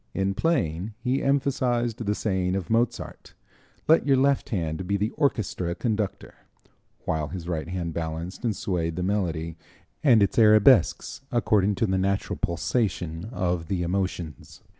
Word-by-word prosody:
In 95 Hz, 0 st, 0 dB
playing 105 Hz, -, -1 dB
he 125 Hz, +3 st, -1 dB
emphasized 125 Hz, -4 st, 0 dB
the 105 Hz, -1 st, 0 dB
saying 95 Hz, -4 st, -1 dB
of 95 Hz, -1 st, -4 dB
Mozart: 115 Hz, +1 st, -1 dB, 0.5 s
"Let 160 Hz, -1 st, +4 dB
your 135 Hz, -1 st, +5 dB
left 140 Hz, +1 st, +2 dB
hand 90 Hz, -, -2 dB
be 100 Hz, +1 st, +1 dB
the 105 Hz, +3 st, -1 dB
orchestra 110 Hz, -, -1 dB
conductor," 110 Hz, -4 st, -2 dB, 0.7 s
while 80 Hz, -2 st, -1 dB
his 85 Hz, +2 st, -7 dB
right 80 Hz, -3 st, -3 dB
hand 85 Hz, -2 st, -3 dB
balanced 80 Hz, +5 st, -5 dB
and 115 Hz, -4 st, 0 dB
swayed 85 Hz, -4 st, -2 dB
the 90 Hz, -, -2 dB
melody 85 Hz, -5 st, -2 dB, 0.5 s
and 120 Hz, -8 st, +6 dB
its 100 Hz, -, +1 dB
arabesques 110 Hz, +1 st, +5 dB
according 105 Hz, -4 st, +2 dB
to 105 Hz, -, +1 dB
the 95 Hz, -2 st, 0 dB
natural 100 Hz, +1 st, -1 dB
pulsation 85 Hz, -2 st, -1 dB
of 90 Hz, -7 st, -1 dB
the 90 Hz, -1 st, -1 dB
emotions. 90 Hz, -3 st, -4 dB
95 Hz, 145 wpm, -26 LUFS, 85-115 Hz, 0.7 s, and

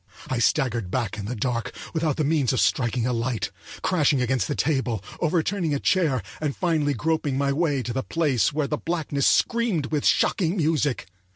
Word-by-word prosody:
I 130 Hz, -, -1 dB
staggered 120 Hz, -, +1 dB
back 110 Hz, -2 st, -2 dB
in 100 Hz, -, -5 dB
the 125 Hz, +4 st, -3 dB
dark, 120 Hz, +1 st, -2 dB, 0.2 s
without 160 Hz, -3 st, 0 dB
the 155 Hz, -, +1 dB
means 145 Hz, -4 st, +2 dB
of 130 Hz, -, +1 dB
striking 120 Hz, -2 st, +1 dB
a 125 Hz, -, 0 dB
light, 115 Hz, -3 st, -2 dB, 0.3 s
crashing 150 Hz, -6 st, +2 dB
against 125 Hz, 0 st, 0 dB
the 145 Hz, -, -2 dB
table, 130 Hz, -8 st, 0 dB, 0.2 s
overturning 165 Hz, 0 st, 0 dB
a -, -, -1 dB
chair, 155 Hz, -10 st, +1 dB, 0.2 s
and 150 Hz, -3 st, -1 dB
finally 155 Hz, -5 st, +1 dB
groping 150 Hz, 0 st, 0 dB
my 140 Hz, 0 st, +1 dB
way 145 Hz, -4 st, 0 dB
to 120 Hz, -, -4 dB
the 130 Hz, -, -1 dB
place 145 Hz, -6 st, +1 dB
where 150 Hz, 0 st, 0 dB
the 150 Hz, +1 st, -2 dB
blackness 155 Hz, -5 st, -1 dB
screamed 225 Hz, -, +1 dB
with 150 Hz, -2 st, 0 dB
shocking 180 Hz, -1 st, +2 dB
music. 150 Hz, -5 st, +1 dB
140 Hz, 185 wpm, -24 LUFS, 125-160 Hz, 0.3 s, means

